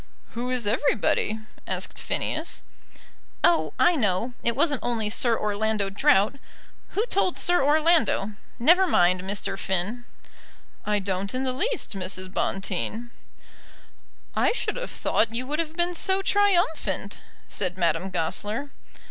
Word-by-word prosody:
"Who 245 +2 -4
is 250 -3 -1
everybody?" 220 -2 +1 0.3
asked - - -2
Phineas. - - -1 0.8
"Oh! 345 - +3
I 350 0 +4
know. 220 - 0
It 235 - 0
wasn't 290 -1 +2
only 225 -3 -1
Sir 230 0 +2
Orlando 210 -1 -1
Drought. 245 +1 +3 0.6
Who 430 - +2
told 390 -6 +1
Sir 350 -5 +3
Orlando? 300 - +3 0.3
Never 345 +10 +5
mind, 180 - +3
Mr. 195 0 -3
Finn." 195 +6 -1 0.8
"I 210 0 +2
don't 195 +2 -3
in 260 - -1
the 260 -1 -1
least, 445 - -1
Mrs. 185 0 -4
Bonteen." 205 +5 -2 1.2
"I - - +2
should - - -2
have - - -4
thought 225 +1 0
you 250 +2 -1
would 300 +4 -3
have 320 -1 -3
been 350 +1 +1
so 380 +3 +2
triumphant," 350 - +1 0.3
said 185 -2 -2
Madame 170 +1 0
Goesler. 205 - -1
230 Hz, 130 wpm, -25 LUFS, 195-310 Hz, 1.2 s, Never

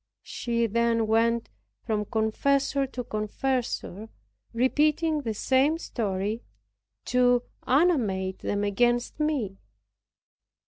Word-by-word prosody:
She 235 -1 -1
then 230 +1 +1
went 230 +1 +2 0.4
from 210 -1 -1
confessor 270 +6 +1
to 250 -1 -5
confessor, 220 -1 -3 0.4
repeating 300 +5 +2
the 225 -5 -3
same 270 +8 +2
story, 210 - -3 0.6
to 245 -1 +3 0.2
animate 225 - +2
them 205 0 -2
against 240 +6 +1
me. 265 -11 -1
235 Hz, 90 wpm, -27 LUFS, 215-270 Hz, 0.6 s, to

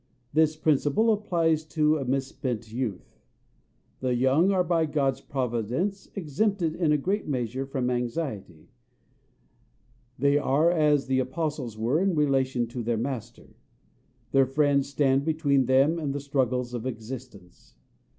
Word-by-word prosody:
This 155 0 +3
principle 155 +8 +2
applies 165 -6 +1
to 155 0 +1
a 135 - -3
misspent 130 -4 -3
youth. 115 -7 -5 0.8
The 130 -1 0
young 135 +10 +3
are 185 -2 +2
by 165 -2 +1
God's 140 -3 0
Providence, 130 - -2
exempted 180 0 -1
in 165 -4 +1
a 150 - +4
great 195 +8 -2
measure 130 -1 -2
from 130 -2 -1
anxiety; 120 - -4 1.5
they 140 +2 +3
are 150 +4 +3
as 150 -4 +2
the 130 0 +1
apostles 130 -3 -3
were 120 +9 +1
in 195 -2 +1
relation 135 -4 +1
to 120 +1 -5
their 115 0 -1
Master: 120 -1 -6 0.8
their 135 -1 +4
friends 140 0 +2
stand 135 -1 +2
between 145 -4 +1
them 135 +6 +3
and 145 -3 -3
the - - -2
struggles 130 -3 -1
of 120 +1 -4
existence. 115 -6 -9
135 Hz, 135 wpm, -26 LUFS, 125-155 Hz, 1.5 s, a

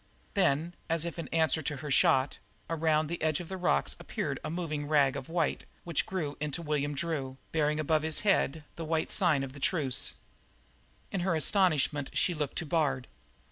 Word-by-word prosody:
Then, 170 -3 +2 0.2
as 165 0 +2
if 170 0 -5
in 165 - -4
answer 160 -1 +2
to 150 0 -2
her 150 -1 -5
shot, 135 0 +3 0.3
around 160 -1 +2
the 170 +3 -4
edge 155 -2 +2
of 175 - -7
the 190 - -3
rocks 125 - +1
appeared - - -3
a - - -3
moving 155 -3 -3
rag 145 -3 +4
of 135 0 -6
white 165 -2 0 0.2
which 170 -4 0
grew 160 -6 -2
into 150 +3 -3
William 145 -1 -1
Drew, 140 -5 -3
bearing 150 -1 +1
above 155 0 +2
his 160 0 0
head 160 -7 +2
the 165 - -4
white 160 0 0
sign 165 -8 +3
of 130 -1 -6
the 140 - -10
truce. 140 -3 +1 1.0
In 195 - -1
her 175 -1 +1
astonishment 155 -5 +2
she 180 - +2
looked 150 -4 -3
to 175 - -1
Bard. 145 -5 0
155 Hz, 185 wpm, -30 LUFS, 145-170 Hz, 1.0 s, rag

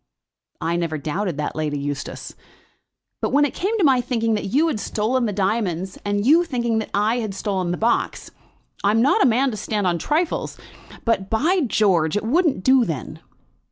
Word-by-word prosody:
"I 170 +1 -1
never 165 -2 -2
doubted 160 +3 -3
that, 150 - -3
Lady 150 -1 -2
Eustace. 140 0 -5 0.9
But - - 0
when 290 +2 +4
it 290 - -3
came 420 +5 -1
to 400 - +1
my 265 -4 +4
thinking 230 -2 -1
that 210 - -2
you 275 +11 +2
had 280 -10 -1
stolen 235 +4 0
the - - -1
diamonds, 190 -2 -1
and 205 0 -1
you 320 +6 +5
thinking 235 -8 -1
that 220 - -5
I 215 +4 +1
had 215 -4 -4
stolen 190 -3 -2
the 175 - -1
box! 235 +2 -1 0.5
I'm 215 +3 +3
not 280 - +3
a 265 - +5
man 255 +4 +2
to 215 - -5
stand 210 -1 -2
on 175 -2 +1
trifles, 320 - -1 0.5
but, 210 -5 0
by 330 +12 +2
George, 185 -6 +2
it 210 - -2
wouldn't 295 - +1
do 260 -1 +5
then." 160 - -5
215 Hz, 190 wpm, -22 LUFS, 185-255 Hz, 0.9 s, you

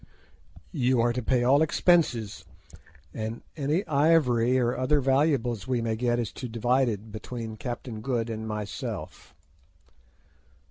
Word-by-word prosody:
You 130 -5 +2
are 120 +1 +2
to 125 - -2
pay 125 0 +1
all 135 +4 +4
expenses, 125 - +2 0.7
and 110 +1 -5
any 155 +6 0
ivory 140 -5 +3
or 120 -1 +1
other 130 +4 +2
valuables 130 -5 +1
we 125 -2 0
may 115 -1 -1
get 120 +1 0
is 115 -4 -2
to 125 - -6
be - - -12
divided 115 -2 0
between 110 +1 -6
Captain 120 -1 -6
Good 120 -2 -1
and 110 -1 -5
myself. 105 -1 -6
120 Hz, 135 wpm, -27 LUFS, 115-135 Hz, 0.7 s, all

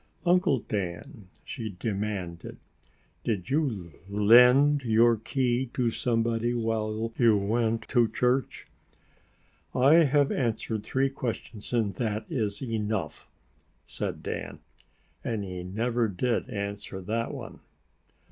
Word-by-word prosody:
"Uncle 180 -4 +4
Dan," 100 - -5 0.2
she 110 -6 -6
demanded, 100 -5 -4 0.7
"did 100 -4 -2
you 115 - -1 0.2
lend 125 +8 +6
your 115 -1 +4
key 125 +3 -1
to 120 -3 +1
somebody 115 0 0
while 110 -1 -1
you 115 -4 +5
went 110 +3 0
to 120 -3 +4
church?" 125 +2 0 1.1
"I 150 +6 +6
have 145 0 +3
answered 110 -3 -1
three 135 +4 0
questions 115 -5 -5
and 110 -5 +1
that 110 -2 -2
is 110 -6 -1
enough!" 110 -4 -3 0.6
said - - -5
Dan. - - -5 0.7
And 110 -3 -2
he 90 -2 -6
never 115 +5 0
did 110 +5 -1
answer 100 -1 -5
that 115 +5 -2
one. - - -8
115 Hz, 110 wpm, -27 LUFS, 105-125 Hz, 1.1 s, lend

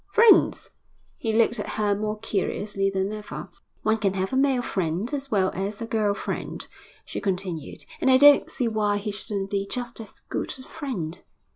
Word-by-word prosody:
'Friends!' 450 -1 +5 0.4
He 225 - -2
looked 230 +1 +3
at - - -4
her 210 -1 +2
more 215 +1 -2
curiously 205 -1 -1
than 195 +1 -1
ever. 210 -1 -7 0.3
'One 220 +1 +2
can 195 -2 +1
have 190 +4 -1
a - - +2
man 265 -2 +3
friend 185 - -2
as 280 -1 -3
well 190 -4 +2
as 200 +2 -3
a 230 - -3
girl 215 -3 +1
friend,' - - -4 0.4
she - - -5
continued. 185 -6 -3
'And - - +2
I 260 - +7
don't 285 +1 +7
see 250 -3 -1
why 210 -2 +1
he 210 +1 -3
shouldn't 200 -1 -4
be 200 -1 -1
just 240 -2 -4
as 215 - -13
good - - -4
a 260 - -11
friend.' 205 - -5
210 Hz, 185 wpm, -25 LUFS, 195-240 Hz, 0.4 s, I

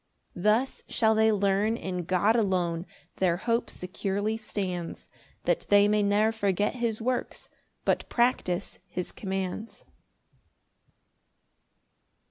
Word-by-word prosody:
4 175 - -8
Thus 220 +7 +2
shall 220 -2 +3
they 220 0 +4
learn 205 +2 +2
in 180 -4 -4
God 185 +6 +3
alone 180 -5 0 0.3
Their 175 -2 +2
hope 230 +5 0
securely 200 +3 -2
stands, 190 -6 -4 0.4
That - - 0
they 205 0 +6
may 210 0 +3
ne'er 205 +2 +3
forget 205 0 0
his 230 -3 -1
works, 250 +1 -2 0.4
But - - +1
practise 225 -7 0
his 180 0 -4
commands. 195 +2 -4
205 Hz, 110 wpm, -28 LUFS, 185-220 Hz, 0.4 s, they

